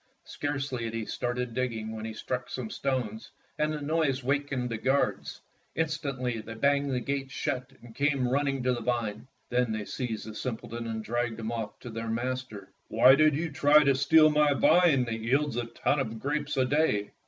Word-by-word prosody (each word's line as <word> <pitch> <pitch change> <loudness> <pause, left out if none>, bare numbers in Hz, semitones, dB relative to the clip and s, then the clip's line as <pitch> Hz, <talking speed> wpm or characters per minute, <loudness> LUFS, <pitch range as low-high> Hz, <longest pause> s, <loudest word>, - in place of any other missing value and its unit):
Scarcely 135 -4 -3
had 115 0 -4
he 115 -1 -3
started 120 +1 -3
digging 115 -3 -2
when 110 0 -6
he 110 - -5
struck 125 +3 -4
some 120 -4 -5
stones, 125 -6 -2 0.3
and 150 0 +2
the 150 -1 -4
noise 145 -3 0
wakened 140 -2 -1
the 110 - -3
guards. 135 +4 0 0.4
Instantly 140 -7 -2
they 115 +1 -8
banged 140 +3 +2
the 125 - 0
gates 135 +1 -3
shut 130 -1 -3
and 120 -2 -12
came 140 -1 +1
running 135 0 0
to 125 0 +2
the 120 - -4
vine. 115 -1 -2 0.2
Then 125 -1 +1
they 110 -1 -3
seized 115 -4 -4
the 110 - -7
simpleton 115 0 -5
and 110 -1 -4
dragged 120 0 -2
him 110 0 -3
off 115 -3 -4
to 120 - -8
their 115 +1 -5
master. 120 -3 -4 0.2
"'Why 130 - +6
did 155 +1 +4
you 160 +2 -2
try 150 +1 +5
to 140 -1 +4
steal 155 +3 +5
my 150 -1 +3
vine 160 -4 +4
that 115 -1 -3
yields 135 +4 +1
a 120 0 -1
ton 120 +5 0
of 115 -4 -3
grapes 145 +2 -2
a 130 - +3
day?" 125 -7 +1
125 Hz, 195 wpm, -28 LUFS, 115-140 Hz, 0.4 s, Why